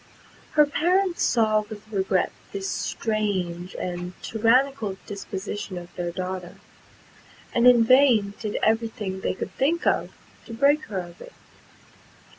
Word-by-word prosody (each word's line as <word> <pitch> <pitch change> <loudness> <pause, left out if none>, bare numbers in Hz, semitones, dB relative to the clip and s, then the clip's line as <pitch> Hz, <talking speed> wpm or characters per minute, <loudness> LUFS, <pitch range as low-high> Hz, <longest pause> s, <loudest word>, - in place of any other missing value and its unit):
Her 300 -1 +6
parents 350 +5 +1
saw 215 -2 +3
with 215 0 -9
regret 190 -2 +1 0.2
this 195 -1 -3
strange 190 -7 -2
and 180 0 -4
tyrannical 230 -2 +2
disposition 200 -1 -5
of 175 0 -10
their 175 -1 -2
daughter, 185 0 -5 1.0
and 235 +1 +4
in 240 -2 +7
vain 235 -5 +5
did 210 -2 -3
every 225 +1 +3
thing 195 -4 -5
they - - -1
could 190 - -5
think 320 - 0
of - - +2 0.4
to 230 - -7
break 285 +5 +3
her 195 -4 -3
of 175 -1 -12
it. - - -11
215 Hz, 135 wpm, -25 LUFS, 190-250 Hz, 1.0 s, in